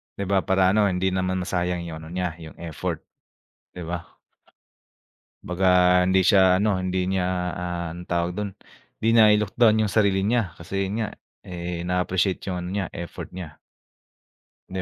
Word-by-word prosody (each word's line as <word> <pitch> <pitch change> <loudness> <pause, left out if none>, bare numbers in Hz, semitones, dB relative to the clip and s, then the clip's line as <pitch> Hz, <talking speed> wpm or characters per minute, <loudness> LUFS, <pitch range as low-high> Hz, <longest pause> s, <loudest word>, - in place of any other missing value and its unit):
'Di - - -6
ba, 100 -1 +2
para 95 -1 +3
ano, 105 +2 +3
hindi 95 -1 +1
naman 95 0 -1
masayang 90 -1 -1
yung 85 -2 -6
ano 80 - -10
niya, 90 -3 -2
yung 80 -2 -10
effort, 85 -3 -4 0.7
'di 90 - -8
ba? 85 0 -4 1.4
'Baga 90 +2 -2 0.4
hindi 95 0 +3
siya 95 -1 +5
ano, 105 -3 +1
hindi 95 0 -1
niya, 95 -1 0 0.3
ah, 90 -1 -4
ang 90 +1 -9
tawag 85 0 0
do'n, 105 -1 -3 0.5
hindi 110 - +2
nai-look 105 -2 +5
down 110 -2 +5
yung 105 - -1
sarili 100 -3 +2
niya, 105 -4 0
kasi 95 +3 -3
'yon 95 - -4
nga, - - -3 0.3
eh, 85 -1 -5
na-appreciate 90 +1 0
yung 90 -2 -2
ano 90 - -5
niya, 100 -1 -1
effort 85 0 -7
niya. 80 -4 -8 1.1
'Di 95 0 -3
95 Hz, 165 wpm, -24 LUFS, 90-100 Hz, 1.4 s, siya